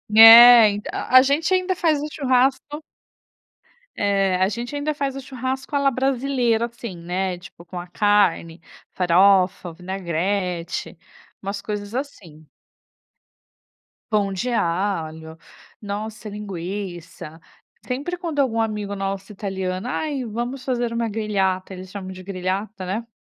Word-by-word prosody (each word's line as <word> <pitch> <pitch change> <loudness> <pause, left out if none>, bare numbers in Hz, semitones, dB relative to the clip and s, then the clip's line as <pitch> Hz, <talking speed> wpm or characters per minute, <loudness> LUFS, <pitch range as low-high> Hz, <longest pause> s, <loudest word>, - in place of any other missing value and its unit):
É, 230 0 +10
ent 205 0 -4
a 255 - +3
a - - +10
gente 290 +7 +1
ainda 370 0 +1
faz 320 -4 +1
o 300 - -3
churrasco 270 +2 0 1.1
É, 195 -2 +1
a 185 - +2
gente 240 +5 -5
ainda 290 +1 -1
faz 275 -2 -3
o - - -5
churrasco 260 +2 -5
à 285 - +3
la 275 0 +3
brasileira 255 -3 0
assim, 235 -5 -8
né, 180 +2 -3
tipo, 175 0 -14
com 175 +1 -7
a 175 - -8
carne, 180 -4 +1 0.3
farofa, 180 -1 +3
vinagrete, 180 0 -3 0.4
umas 200 +1 -5
coisas 210 +1 -5
assim. 175 - -7 1.6
Pão 205 -2 +1
de 215 +7 -3
alho, 165 -5 -2 0.4
nossa 215 +1 -6
linguiça, 180 -5 -7 0.4
sempre 285 +8 -3
quando 335 -5 -4
algum 230 -5 +1
amigo 210 -2 -3
nosso 195 +1 -4
italiano: 190 0 -4
"Ai, 280 0 -2
vamos 240 +4 -5
fazer 240 -3 -1
uma 230 -1 -1
grigliata," 195 -3 -1
eles 185 0 -10
chamam 190 -2 -7
de 185 0 -11
grigliata, 190 +1 -4
né. 220 +5 -4
205 Hz, 130 wpm, -22 LUFS, 185-250 Hz, 1.6 s, É